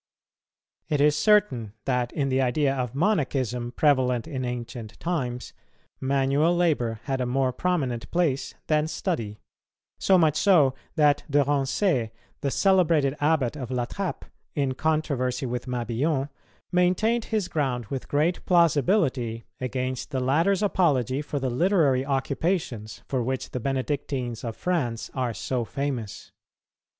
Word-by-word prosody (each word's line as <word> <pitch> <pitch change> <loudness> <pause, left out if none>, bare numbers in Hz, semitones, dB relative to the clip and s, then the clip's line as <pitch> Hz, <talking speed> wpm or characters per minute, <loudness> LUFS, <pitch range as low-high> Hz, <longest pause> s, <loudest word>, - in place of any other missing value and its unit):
It 150 -3 +1
is 150 +1 +4
certain 150 - +2
that, 125 -2 0
in 140 -3 -1
the 130 0 +2
idea 135 +2 +2
of 125 -2 -3
Monachism, 135 - 0
prevalent 130 -6 +2
in 130 -2 -4
ancient 120 -2 -6
times, 125 -8 -3 0.5
manual 140 +5 +2
labour 125 -10 +1
had 135 -2 -2
a 125 - -1
more 130 0 +1
prominent 135 -8 -1
place 165 -6 0
than 155 0 +2
study; 120 - -3 0.6
so 190 - +4
much 155 -4 +3
so 160 -10 +5 0.2
that 145 -2 +3
De 145 0 +4
Rancé, 140 - +1 0.3
the 140 - -1
celebrated 165 -6 +3
Abbot 145 -4 +1
of 130 -5 -6
La 125 -2 -1
Trappe, 195 +7 -4 0.3
in 140 -3 0
controversy 140 -3 -1
with 125 +1 -4
Mabillon, 125 +4 -1 0.4
maintained 185 +6 +2
his 215 -5 -1
ground 130 -6 -1
with 135 -2 -4
great 155 +5 +1
plausibility 145 - +2
against 130 0 -3
the 135 -3 -2
latter's 165 +10 +2
apology 145 - +2
for 150 -1 -4
the 130 -2 -1
literary 145 -3 +3
occupations 135 - -2
for 130 -2 -1
which 130 +2 -3
the 125 - -3
Benedictines 130 -2 -2
of 115 -2 -5
France 125 -11 -2
are 125 -4 -2
so 120 +2 -2
famous. 130 -4 -4
135 Hz, 135 wpm, -26 LUFS, 125-160 Hz, 0.6 s, so